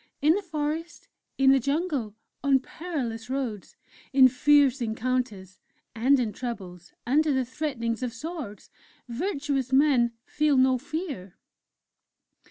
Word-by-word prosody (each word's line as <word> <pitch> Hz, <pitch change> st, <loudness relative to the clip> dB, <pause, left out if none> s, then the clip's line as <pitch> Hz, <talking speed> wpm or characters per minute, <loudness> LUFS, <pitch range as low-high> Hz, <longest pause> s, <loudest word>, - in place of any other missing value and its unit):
_'In 305 Hz, +2 st, +6 dB
the 405 Hz, -, -1 dB
forest, 320 Hz, -1 st, -4 dB, 0.3 s
in 270 Hz, 0 st, +5 dB
the 270 Hz, -, +5 dB
jungle, 280 Hz, -, -1 dB, 0.3 s
on 275 Hz, -1 st, +4 dB
perilous 255 Hz, -7 st, -5 dB
roads, 255 Hz, -7 st, -4 dB, 0.4 s
in 265 Hz, -1 st, +7 dB
fierce 275 Hz, +1 st, +4 dB
encounters, 220 Hz, -4 st, -2 dB, 0.4 s
and 260 Hz, +5 st, +4 dB
in 225 Hz, -4 st, -1 dB
troubles, 185 Hz, -8 st, -7 dB
under 300 Hz, +5 st, +3 dB
the 265 Hz, -2 st, +1 dB
threatenings 245 Hz, -4 st, -3 dB
of 250 Hz, -2 st, -2 dB
swords 280 Hz, -4 st, -7 dB, 0.4 s
Virtuous 275 Hz, -, -2 dB
men 265 Hz, -4 st, +4 dB
feel 300 Hz, -2 st, +1 dB
no 260 Hz, 0 st, +4 dB
fear! 285 Hz, -, -6 dB
265 Hz, 120 wpm, -26 LUFS, 235-295 Hz, 0.4 s, in